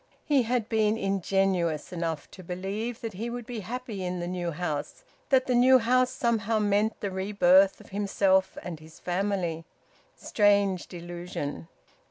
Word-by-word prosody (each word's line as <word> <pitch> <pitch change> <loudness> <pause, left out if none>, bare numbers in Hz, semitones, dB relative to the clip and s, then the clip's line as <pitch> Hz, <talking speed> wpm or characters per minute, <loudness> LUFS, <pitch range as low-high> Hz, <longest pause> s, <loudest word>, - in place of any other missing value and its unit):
He 285 -3 +3
had 235 -2 0
been 220 -2 +2
ingenuous 195 -5 0
enough 165 -3 -3
to 185 - -11
believe 200 +7 -4
that 225 -3 -5
he 225 +6 -4
would 240 0 -5
be 240 -2 -5
happy 225 -1 -5
in 180 0 -3
the 175 - -3
new 175 -1 -2
house 160 - -4 0.3
that 260 -2 +4
the 255 - 0
new 255 +2 +6
house 255 +1 +3
somehow 225 -3 0
meant 210 +1 +1
the 200 - -2
rebirth 190 0 +4
of - - -15
himself 195 -1 +1
and 170 -3 -6
his 160 0 -15
family. 180 -2 -1 0.5
Strange 200 -3 +2
delusion! 175 -3 -6
195 Hz, 155 wpm, -27 LUFS, 180-225 Hz, 0.5 s, new